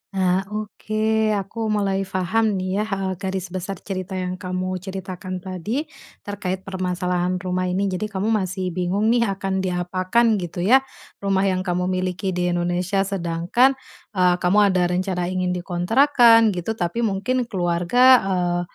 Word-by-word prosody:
Ah, 185 Hz, 0 st, +2 dB
oke 215 Hz, +1 st, -1 dB
aku 215 Hz, +3 st, -3 dB
mulai 200 Hz, -2 st, 0 dB
paham 200 Hz, +4 st, 0 dB
nih 185 Hz, +1 st, -2 dB
ya, -, -, +1 dB
e -, -, -6 dB, 0.2 s
garis 190 Hz, -1 st, -3 dB
besar 190 Hz, +1 st, -4 dB
cerita 190 Hz, -1 st, -4 dB
yang 185 Hz, 0 st, -3 dB
kamu 185 Hz, 0 st, -3 dB
ceritakan 185 Hz, -1 st, -6 dB
tadi, 190 Hz, -, -3 dB, 0.4 s
terkait 190 Hz, -2 st, -4 dB
permasalahan 180 Hz, -1 st, -1 dB
rumah 185 Hz, 0 st, -2 dB
ini. 185 Hz, +2 st, 0 dB
Jadi 185 Hz, +3 st, -2 dB
kamu 205 Hz, 0 st, -3 dB
masih 185 Hz, -3 st, -1 dB
bingung 185 Hz, +5 st, 0 dB
nih 235 Hz, -2 st, +3 dB
akan 190 Hz, 0 st, -2 dB
diapakan 185 Hz, +5 st, +1 dB
gitu 175 Hz, -1 st, -4 dB
ya, 250 Hz, +8 st, +6 dB, 0.4 s
rumah 195 Hz, -1 st, +2 dB
yang 185 Hz, -1 st, +1 dB
kamu 180 Hz, 0 st, -1 dB
miliki 185 Hz, +1 st, -2 dB
di 180 Hz, 0 st, -1 dB
Indonesia, 175 Hz, +2 st, 0 dB
sedangkan, 195 Hz, +7 st, +1 dB, 0.4 s
eee, 180 Hz, -1 st, +4 dB
kamu 185 Hz, +4 st, +3 dB
ada 180 Hz, -1 st, +2 dB
rencana 180 Hz, 0 st, -1 dB
ingin 185 Hz, -1 st, -1 dB
dikontrakkan, 225 Hz, +5 st, +4 dB
gitu, 175 Hz, +5 st, -3 dB
tapi 200 Hz, +4 st, -2 dB
mungkin 225 Hz, +5 st, 0 dB
keluarga, 180 Hz, +2 st, +1 dB, 0.2 s
eee, 180 Hz, -2 st, 0 dB
185 Hz, 145 wpm, -22 LUFS, 180-205 Hz, 0.4 s, ya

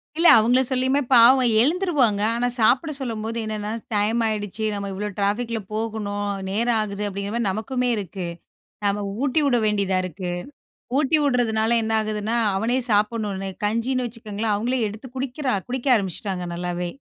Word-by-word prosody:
இல்ல. 335 Hz, +1 st, +4 dB
அவுங்கள 245 Hz, +4 st, +3 dB
சொல்லியுமே 260 Hz, +2 st, +2 dB
பாவம் 245 Hz, +1 st, +7 dB
எழுந்துருவாங்க. 285 Hz, -, +2 dB
ஆனா, 245 Hz, +1 st, 0 dB
சாப்பிட 270 Hz, +8 st, +3 dB
சொல்லும்போது 230 Hz, -2 st, -4 dB
என்னென்னா 215 Hz, -1 st, -4 dB, 0.2 s
டைம் 220 Hz, +3 st, +1 dB
ஆயிடுச்சு 215 Hz, 0 st, -3 dB
நம்ம 200 Hz, 0 st, -4 dB
இவ்ளோ 210 Hz, +2 st, -3 dB
ட்ராஃபிக் 225 Hz, +4 st, 0 dB
ல -, -, -1 dB
போகணும். 210 Hz, -2 st, -3 dB, 0.2 s
நேரம் 230 Hz, +3 st, +1 dB
ஆகுது 205 Hz, -1 st, -4 dB
அப்பிடிங்கிறமாரி 200 Hz, +3 st, -3 dB
நமக்குமே 250 Hz, +5 st, -2 dB
இருக்கு. 185 Hz, -2 st, -5 dB, 0.6 s
நம்ம 200 Hz, 0 st, 0 dB, 0.2 s
ஊட்டி 285 Hz, +3 st, +2 dB
விட 250 Hz, -3 st, +3 dB
வேண்டியதா 200 Hz, -3 st, +1 dB
இருக்கு. 180 Hz, 0 st, -5 dB, 0.7 s
ஊட்டி 300 Hz, +2 st, +3 dB
விடுறதுனால 235 Hz, -4 st, +2 dB
என்ன 220 Hz, 0 st, -2 dB
ஆகுதுன்னா, 215 Hz, +1 st, -2 dB, 0.2 s
அவனே 230 Hz, +5 st, 0 dB
சாப்பிட்ணுன்னு 205 Hz, -2 st, 0 dB, 0.2 s
கஞ்சின்னு 240 Hz, +4 st, 0 dB
வச்சுக்கோங்களேன், 220 Hz, -2 st, -3 dB
அவுங்களே 245 Hz, +4 st, -1 dB
எடுத்து 215 Hz, +5 st, -9 dB
குடிக்கிறா, 260 Hz, -1 st, -2 dB
குடிக்க 260 Hz, +2 st, -3 dB
ஆரம்பிச்சுட்டாங்க 190 Hz, -2 st, -3 dB
நல்லாவே! 175 Hz, 0 st, -3 dB
220 Hz, 140 wpm, -23 LUFS, 205-245 Hz, 0.7 s, பாவம்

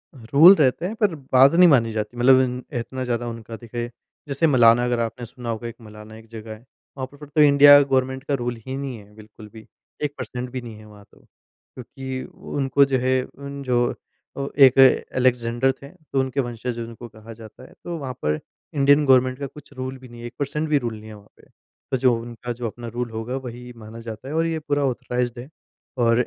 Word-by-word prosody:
Rule 140 Hz, -, +7 dB
रहते 150 Hz, +1 st, +1 dB
हैं 215 Hz, +4 st, -3 dB
पर 205 Hz, -5 st, +3 dB, 0.2 s
बात 130 Hz, +2 st, +7 dB
नहीं 180 Hz, +1 st, +7 dB
मानी 120 Hz, -6 st, +3 dB
जाती। 110 Hz, +2 st, -4 dB
मतलब 130 Hz, +2 st, +6 dB
इन 125 Hz, -1 st, -2 dB, 0.2 s
इतना 130 Hz, +2 st, -5 dB
ज़्यादा 120 Hz, -1 st, -2 dB
उनका 115 Hz, -1 st, -7 dB
देखिए 120 Hz, 0 st, -6 dB, 0.4 s
जैसे 140 Hz, +4 st, +1 dB
मलाना 120 Hz, -4 st, +5 dB
अगर 120 Hz, -1 st, 0 dB
आपने 115 Hz, +1 st, -3 dB
सुना 120 Hz, 0 st, -9 dB
होगा, 115 Hz, +1 st, -4 dB
एक 115 Hz, -, -8 dB
मलाना 105 Hz, 0 st, -12 dB
एक 110 Hz, 0 st, -14 dB
जगह 110 Hz, -1 st, -9 dB
है। 110 Hz, +3 st, -15 dB, 0.3 s
वहाँ 130 Hz, -, -3 dB
पर 145 Hz, +1 st, -12 dB
तो 150 Hz, +1 st, +1 dB
इंडिया 145 Hz, 0 st, +8 dB
गवर्नमेंट 130 Hz, -1 st, 0 dB
का 145 Hz, -, -3 dB
रूल 120 Hz, 0 st, -2 dB
ही 130 Hz, -, -5 dB
नहीं 135 Hz, -3 st, -5 dB
है 105 Hz, 0 st, -16 dB
बिल्कुल 110 Hz, 0 st, -14 dB
भी, 110 Hz, -1 st, -12 dB, 0.4 s
1 145 Hz, -1 st, -1 dB
पर्सेंट 125 Hz, 0 st, -6 dB
भी 130 Hz, 0 st, -5 dB
नहीं 115 Hz, -2 st, -9 dB
है 110 Hz, -, -14 dB
वहाँ 105 Hz, -1 st, -16 dB
तो। -, -, -22 dB
क्योंकि 130 Hz, +1 st, -10 dB, 0.3 s
उनको 140 Hz, 0 st, +3 dB
जो 135 Hz, -1 st, 0 dB
है 130 Hz, +1 st, +1 dB
उन 140 Hz, +1 st, -9 dB
जो 120 Hz, -2 st, +1 dB, 0.7 s
एक 130 Hz, 0 st, +6 dB, 0.4 s
एलेक्जेंडर 125 Hz, 0 st, +1 dB
थे 140 Hz, -, -10 dB
तो 155 Hz, -5 st, -5 dB
उनके 130 Hz, +1 st, -1 dB
वंशज 120 Hz, -1 st, -5 dB
उनको 115 Hz, +1 st, -8 dB
कहा 110 Hz, +1 st, -12 dB
जाता 110 Hz, +2 st, -14 dB
है। -, -, -15 dB
तो 175 Hz, -1 st, -5 dB
वहाँ 135 Hz, -4 st, -5 dB
पर 75 Hz, 0 st, 0 dB, 0.3 s
इंडियन 145 Hz, +1 st, +4 dB
गवर्नमेंट 130 Hz, -1 st, +3 dB
का 140 Hz, -, -3 dB
कुछ 145 Hz, +2 st, -15 dB
रूल 130 Hz, 0 st, -6 dB
भी 130 Hz, 0 st, -14 dB
नहीं 120 Hz, 0 st, -12 dB
है, 120 Hz, -, -6 dB
1 120 Hz, -, -11 dB
पर्सेंट 150 Hz, +2 st, -2 dB
भी 150 Hz, -, +3 dB
रूल 120 Hz, -4 st, -3 dB
नहीं 110 Hz, -, -13 dB
है -, -, -9 dB
वहाँ 105 Hz, 0 st, -17 dB
पे। -, -, -22 dB, 0.4 s
तो 130 Hz, -, +1 dB
जो 125 Hz, -1 st, +3 dB
उनका 120 Hz, +1 st, -7 dB
जो 120 Hz, 0 st, -5 dB
अपना 120 Hz, +2 st, -8 dB
रूल 120 Hz, +1 st, -4 dB
होगा 115 Hz, +3 st, -4 dB
वही 125 Hz, +1 st, -8 dB
माना 110 Hz, +1 st, -11 dB
जाता 115 Hz, +2 st, -8 dB
है 145 Hz, -, -5 dB
और 165 Hz, +1 st, +2 dB
ये 165 Hz, -1 st, -2 dB
पूरा 145 Hz, -1 st, -1 dB
ऑथराइज़्ड 125 Hz, -2 st, -2 dB
है 125 Hz, +3 st, -9 dB, 0.5 s
और 115 Hz, -1 st, +3 dB
125 Hz, 220 wpm, -22 LUFS, 115-135 Hz, 0.7 s, इंडिया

